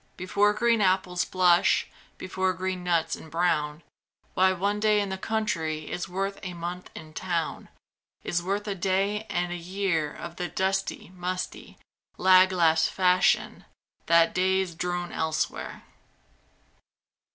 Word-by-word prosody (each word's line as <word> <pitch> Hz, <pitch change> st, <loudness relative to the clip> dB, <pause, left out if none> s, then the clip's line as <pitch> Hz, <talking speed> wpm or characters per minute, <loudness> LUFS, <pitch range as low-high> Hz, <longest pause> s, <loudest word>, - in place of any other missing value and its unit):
Before 200 Hz, +3 st, +2 dB
green 230 Hz, +1 st, +2 dB
apples 185 Hz, -2 st, +1 dB
blush, 180 Hz, -2 st, +3 dB, 0.3 s
Before 185 Hz, 0 st, -1 dB
green 185 Hz, 0 st, -3 dB
nuts 165 Hz, -2 st, +1 dB
embrown, 155 Hz, -2 st, -1 dB, 0.5 s
Why, 190 Hz, 0 st, +4 dB
one 200 Hz, +3 st, -1 dB
day 210 Hz, 0 st, +3 dB
in 200 Hz, -1 st, -1 dB
the 190 Hz, -, -3 dB
country 165 Hz, -9 st, -2 dB
Is 175 Hz, -, -4 dB
worth 195 Hz, +2 st, -3 dB
a 180 Hz, -2 st, -6 dB
month 175 Hz, +1 st, -6 dB
in 155 Hz, 0 st, -10 dB
town; 170 Hz, -2 st, -3 dB, 0.5 s
Is 175 Hz, -, -1 dB
worth 200 Hz, +4 st, -2 dB
a 205 Hz, -, -1 dB
day 195 Hz, +3 st, 0 dB
and 175 Hz, 0 st, -1 dB
a -, -, -3 dB
year 175 Hz, -3 st, -1 dB
Of 170 Hz, -, -9 dB
the 180 Hz, -, -2 dB
dusty, 190 Hz, +2 st, -2 dB
musty, 180 Hz, 0 st, -5 dB, 0.4 s
lag 185 Hz, 0 st, +6 dB
last 165 Hz, -3 st, +3 dB
fashion 185 Hz, -1 st, +2 dB, 0.4 s
That 170 Hz, 0 st, +5 dB
days 190 Hz, -1 st, +1 dB
drone 175 Hz, +1 st, -3 dB
elsewhere. 160 Hz, 0 st, -3 dB
180 Hz, 130 wpm, -27 LUFS, 170-190 Hz, 0.5 s, lag